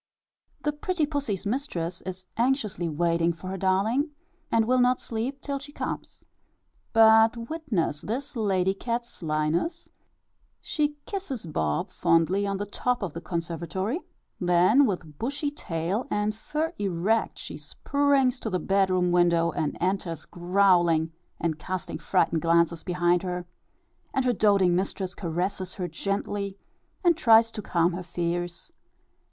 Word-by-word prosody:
The 295 - +1
pretty 360 +1 0
pussy's 280 - -2
mistress 185 - -2
is 185 0 -6
anxiously 230 - 0
waiting 170 +2 +1
for 185 +3 -8
her 190 - -3
darling, 200 - +1 0.4
and 225 -1 +3
will 255 +2 +3
not 250 0 +4
sleep 245 +5 -4
till 280 -1 -3
she 290 +1 -10
comes. - - -6 0.7
But 225 +1 +6
witness 205 - -1
this 255 +6 -4
lady 190 -4 +1
cat's 235 +4 -3
slyness; 160 - -1 0.7
she 295 -2 -1
kisses 340 - -4
Bob 80 - -1
fondly 180 +5 +2
on 195 0 -1
the 205 - -3
top 245 +3 -1
of 175 -6 -3
the 170 - -6
conservatory, 170 - -3 0.4
then 180 +10 +5
with 170 -7 -4
bushy 285 +4 -2
tail 180 - -3
and 210 +1 0
fur 305 +9 -3
erect, 200 +3 0
she - - -7
springs 280 -3 +1
to 225 - -3
the 185 - 0
bedroom 185 -1 +2
window, 170 -1 +3
and 150 - -2
enters 180 -3 -1
growling, 175 -3 +3 0.3
and 160 -2 -1
casting 185 -4 -4
frightened 165 -2 +1
glances 170 0 +2
behind 175 -1 +2
her, 180 -1 -3 0.7
and 265 - +2
her 250 - +3
doating 200 -4 +4
mistress 190 0 -2
caresses 185 +2 -3
her 185 -4 -3
gently, 200 +3 -3 0.5
and 345 -2 +5
tries 230 -5 +5
to 210 - -5
calm 175 -2 +1
her 180 - -4
fears. 175 - -3
195 Hz, 140 wpm, -27 LUFS, 175-240 Hz, 0.7 s, But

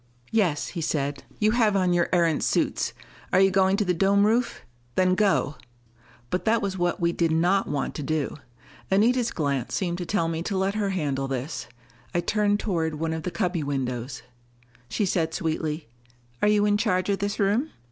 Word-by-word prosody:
"Yes," 185 -10 +1
he 170 - -5
said. 145 -2 -2
"You 215 0 +3
have 220 -3 +3
on 185 -2 +2
your 175 0 +2
Erentz 170 -4 +2
suits: - - 0 0.4
are 185 - +4
you 195 0 +5
going 190 +1 +3
to 210 - +1
the 180 - +2
dome 200 +3 +3
roof? 235 +3 +1 0.3
Then 185 0 +3
go." 185 -6 +1 0.7
But 180 - -1
that 225 +1 +3
was 200 -2 -2
what 175 -1 0
we 170 0 +2
did 170 -1 +1
not 175 +5 +2
want 145 -1 -2
to - - -5
do. 155 0 -1 0.5
Anita's 230 +5 +3
glance 140 -5 -2
seemed 175 -2 -1
to 175 - -3
tell 185 -4 +1
me 165 0 -2
to 195 +3 -2
let 190 +1 +1
her 205 -2 -1
handle 145 -7 -1
this. 135 +3 -4 0.5
I - - +3
turned 205 +2 +1
toward 165 -7 -1
one 160 +1 -2
of 160 - -3
the 170 - -3
cubby 180 -3 -1
windows. 130 -3 -3 0.7
She 200 - 0
said 165 -3 0
sweetly, 155 -2 -2 0.5
"Are - - +4
you 210 0 +4
in 205 0 +3
charge 185 -5 +1
of 200 - +1
this 200 +1 -2
room? 210 +9 +2
180 Hz, 190 wpm, -25 LUFS, 160-200 Hz, 0.7 s, you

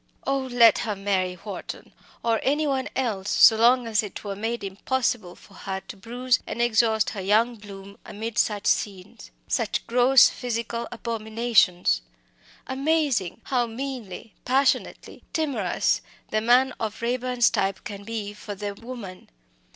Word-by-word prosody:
Oh! 275 0 +1
let 235 -2 +6
her 215 -3 -2
marry 190 -2 -1
Wharton, 190 +1 -8 0.3
or 230 -1 +2
any 295 +3 +1
one 270 -2 -1
else, 210 -7 -1
so 225 - +7
long 240 +2 +4
as 220 -2 +1
it 210 -3 -8
were 200 -1 -4
made 225 +2 -3
impossible 205 -1 -2
for 200 - -19
her 190 0 -5
to - - -8
bruise 245 +5 0
and - - -5
exhaust 220 -2 +2
her 200 - -5
young 220 +5 +2
bloom 200 -2 -12
amid 225 +2 -4
such 205 -2 0
scenes 185 - -2 0.2
such - - -1
gross 250 +2 +6
physical 235 -1 -3
abominations. 225 - +1 0.6
Amazing! 275 - 0
how 245 -3 0
meanly, 230 -4 -6
passionately 265 +2 0
timorous 265 - 0 0.3
the 215 - +1
man 250 +3 +4
of 215 -2 -4
Raeburn's 245 0 +1
type 195 0 -1
can 205 -3 -7
be 210 -1 -5
for 210 0 -8
the 205 +1 -4
woman! 220 -4 -9
225 Hz, 145 wpm, -25 LUFS, 200-245 Hz, 0.6 s, so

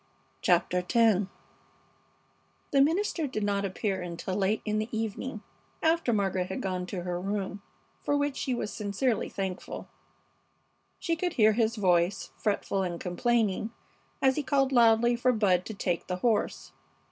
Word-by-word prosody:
CHAPTER 180 +1 +3
X 210 +1 +3 1.4
The 275 - +5
minister 330 +1 +1
did 215 -5 -3
not 200 -1 0
appear 190 0 -2
until 175 +1 -5
late 205 +2 +1
in 215 0 0
the 215 +2 -3
evening, 220 +1 -4 0.4
after 325 -5 +3
Margaret 190 -4 0
had 190 - -4
gone 185 -2 -3
to 180 -2 -4
her 175 0 -3
room, 195 0 -3 0.4
for 290 - +1
which 285 -1 0
she 255 - -1
was 215 - -4
sincerely 215 +3 -1
thankful. 190 -2 -5 1.1
She 335 -2 -1
could 350 +1 -2
hear 220 -3 +5
his 225 0 +1
voice, 180 -3 +1
fretful 200 -2 -1
and 175 -2 -3
complaining, 215 +2 0 0.5
as 265 +1 +4
he - - +2
called 275 -1 +1
loudly 235 -1 +5
for 250 +2 +2
Bud 190 -6 +2
to 220 - -5
take 175 -3 -2
the 180 - -1
horse. 215 +3 0
210 Hz, 150 wpm, -29 LUFS, 190-240 Hz, 1.4 s, The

